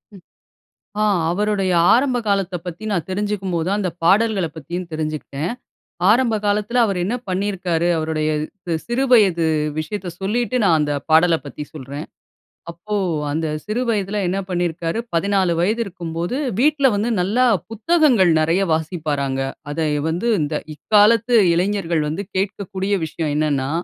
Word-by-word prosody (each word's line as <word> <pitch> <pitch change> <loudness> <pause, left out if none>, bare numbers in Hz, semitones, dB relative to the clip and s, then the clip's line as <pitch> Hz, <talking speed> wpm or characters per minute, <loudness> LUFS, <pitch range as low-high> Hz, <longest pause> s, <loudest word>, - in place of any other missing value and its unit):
ம். 185 - -14 0.8
ஆ - - +3 0.3
அவருடைய 200 -1 0 0.2
ஆரம்ப 255 0 +2
காலத்த 195 -2 0
பத்தி 175 +5 -7
நான் 175 -4 -1
தெரிஞ்சுக்கும் 195 -2 -2
போது 165 +2 -1
அந்த 190 -4 -1
பாடல்களைப் 190 -4 +2
பத்தியும் 170 +4 -6
தெரிஞ்சுக்கிட்டேன். 155 +1 -3 0.6
ஆரம்ப 235 -1 +3
காலத்துல, 210 +4 0
அவரு 195 -3 -2
என்ன 230 +6 -1
பண்ணியிருக்காரு, 185 -3 -1
அவருடைய 155 -1 -1 0.4
சி 170 - -1
சிறு 245 +3 0
வயது 190 -8 +5 0.3
விஷயத்த 180 +4 -4
சொல்லிட்டு, 240 +5 -1
நான் 165 -4 +4
அந்த 145 -1 0 0.2
பாடல 165 +2 +5
பத்தி 145 +1 -7
சொல்றேன். 140 +2 -7 0.7
அப்போ, 210 +5 -5 0.4
அந்த 160 +1 -1 0.2
சிறு 215 +4 -2
வயதுல 205 -1 -1
என்ன 190 +2 -1
பண்ணியிருக்காரு, 175 +2 -1
14 190 +1 +1
வயதிருக்கும்போது 180 -1 -2 0.2
வீட்ல 285 -1 +4
வந்து, 210 +4 0
நல்லா 220 +8 +2 0.3
புத்தகங்கள் 235 - +3
நெறைய 165 +5 +2
வாசிப்பாராங்க. 150 -5 -2 0.3
அத 160 - -5 0.3
வந்து 180 +9 -1
இந்த, 150 +1 -2 0.2
இக்காலத்து 215 - +4 0.2
இளைஞர்கள் 175 -2 0
வந்து 195 +6 -4
கேக்கக்கூடிய 195 0 -2
விஷயம் 155 -1 -3
என்னன்னா, 145 -3 0
185 Hz, 130 wpm, -20 LUFS, 165-210 Hz, 0.8 s, வயது